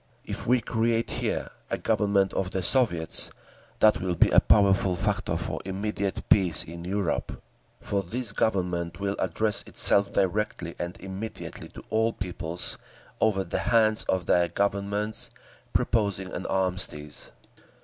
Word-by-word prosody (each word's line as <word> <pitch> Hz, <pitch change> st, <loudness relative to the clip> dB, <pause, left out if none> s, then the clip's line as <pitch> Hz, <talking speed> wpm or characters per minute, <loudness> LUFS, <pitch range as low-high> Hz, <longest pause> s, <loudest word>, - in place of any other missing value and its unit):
If -, -, -5 dB
we 125 Hz, 0 st, +4 dB
create 115 Hz, 0 st, 0 dB
here -, -, -2 dB, 0.2 s
a -, -, -1 dB
Government 100 Hz, -3 st, +1 dB
of 95 Hz, -1 st, -1 dB
the 95 Hz, -1 st, -2 dB
Soviets, 85 Hz, -9 st, +3 dB, 0.5 s
that 110 Hz, 0 st, +5 dB
will 90 Hz, -1 st, -1 dB
be -, -, +4 dB
a -, -, +7 dB
powerful 95 Hz, -2 st, +3 dB
factor 100 Hz, -2 st, -1 dB
for 80 Hz, -, -4 dB
immediate 100 Hz, +1 st, -3 dB
peace 90 Hz, -6 st, +5 dB
in 85 Hz, +1 st, -9 dB
Europe; 95 Hz, 0 st, -2 dB, 0.4 s
for 100 Hz, -1 st, -1 dB
this 115 Hz, +4 st, -1 dB
Government 90 Hz, -5 st, -1 dB
will 100 Hz, 0 st, -1 dB
address 110 Hz, -2 st, +1 dB
itself 100 Hz, 0 st, +3 dB
directly 100 Hz, -3 st, -1 dB
and 85 Hz, +1 st, -5 dB
immediately 95 Hz, +3 st, -7 dB
to -, -, -12 dB
all 110 Hz, +1 st, +2 dB
peoples, 90 Hz, -3 st, -3 dB, 0.4 s
over 100 Hz, -3 st, +2 dB
the -, -, -3 dB
heads 110 Hz, -2 st, +3 dB
of 95 Hz, -2 st, 0 dB
their 85 Hz, 0 st, +3 dB
Governments, 100 Hz, +3 st, -1 dB, 0.4 s
proposing 100 Hz, -4 st, 0 dB
an 90 Hz, -, -4 dB
armistice. 90 Hz, -6 st, -2 dB
100 Hz, 140 wpm, -27 LUFS, 90-105 Hz, 0.5 s, a